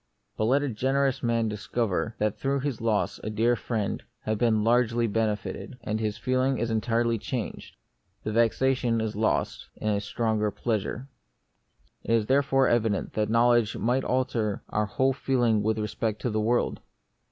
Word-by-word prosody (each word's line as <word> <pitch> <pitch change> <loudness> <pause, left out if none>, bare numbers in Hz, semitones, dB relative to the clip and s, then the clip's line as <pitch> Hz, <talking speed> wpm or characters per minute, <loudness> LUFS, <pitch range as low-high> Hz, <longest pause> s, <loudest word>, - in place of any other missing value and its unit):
But 110 - 0
let 135 +5 +3
a 145 - -1
generous 135 +3 0
man 115 -2 +1
discover 110 0 -2
that 105 0 0
through 135 +4 -1
that 135 -5 -3
loss 110 -2 0
a 110 - -3
dear 115 +3 +2
friend 110 -2 -2 0.2
has 110 - -1
been 110 -3 +2
largely 120 0 +3
benefited, 105 +1 -2
and 110 0 -2
his 105 -2 -2
feeling 130 +1 +1
is 115 -1 -1
entirely 115 +1 +1
changed; 120 +1 -5 0.5
the 110 - -2
vexation 115 +1 +2
is 110 -2 -2
lost 110 +1 -1
in 110 - -2
a 100 -1 +1
stronger 110 0 0
pleasure. 115 +4 -3 1.0
It 115 - 0
is 110 -2 +1
therefore 135 +1 +3
evident 110 -4 +1
that 105 -1 0
knowledge 115 -1 +3
might 125 +3 +1
alter 125 -5 -1
our 105 0 0
whole 135 +4 +1
feeling 120 -5 +1
with 110 +1 0
respect 110 0 -2
to 125 - 0
the 110 0 0
world. 120 +3 +1
115 Hz, 165 wpm, -27 LUFS, 110-125 Hz, 1.0 s, let